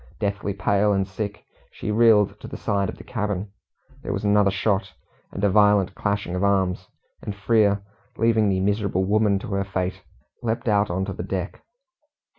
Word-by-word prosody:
Deathly 100 -1 -2
pale 100 +2 +2
and 95 -1 0
sick, 100 +1 -5 0.2
she 105 - -5
reeled 110 -2 +4
to - - -9
the - - -7
side 100 -2 -1
of - - -7
the - - -11
cabin. 105 -3 -3 0.5
There - - -4
was - - -3
another 105 -1 +4
shot, 95 0 0 0.4
and 100 - -6
a 100 - +4
violent 105 -2 +4
clashing 100 -2 -2
of 90 - -1
arms; 95 -2 +1 0.3
and 100 - -5
Frere, 100 -1 +2 0.3
leaving 110 -2 +3
the 95 -1 +1
miserable 100 -1 0
woman 105 0 +2
to 100 - -7
her 100 0 0
fate, 95 -2 -3 0.4
leapt 115 +1 -2
out 105 -1 +3
on 95 +2 -1
to 100 - -4
the - - -6
deck. 95 0 -4
100 Hz, 180 wpm, -24 LUFS, 95-105 Hz, 0.5 s, reeled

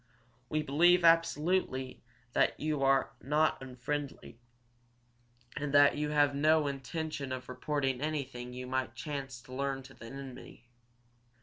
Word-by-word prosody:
We 155 0 0
believe 175 +5 +4
absolutely 165 -4 +2 0.3
that - - +2
you 150 -2 -1
are 135 0 +3
not 150 +2 +1
unfriendly, 135 -1 -5 1.2
and 145 -1 -2
that 145 0 +7
you 150 0 -1
have 145 -1 +3
no 155 +2 +3
intention 140 +1 -4
of 130 0 -5
reporting 135 0 -1
anything 140 -5 -3
you 125 +1 -6
might 130 0 -2
chance 135 -4 -5
to 130 - -12
learn 135 0 -2
to 135 0 -13
an 115 - -9
enemy. 130 -3 -10
140 Hz, 130 wpm, -32 LUFS, 130-150 Hz, 1.2 s, that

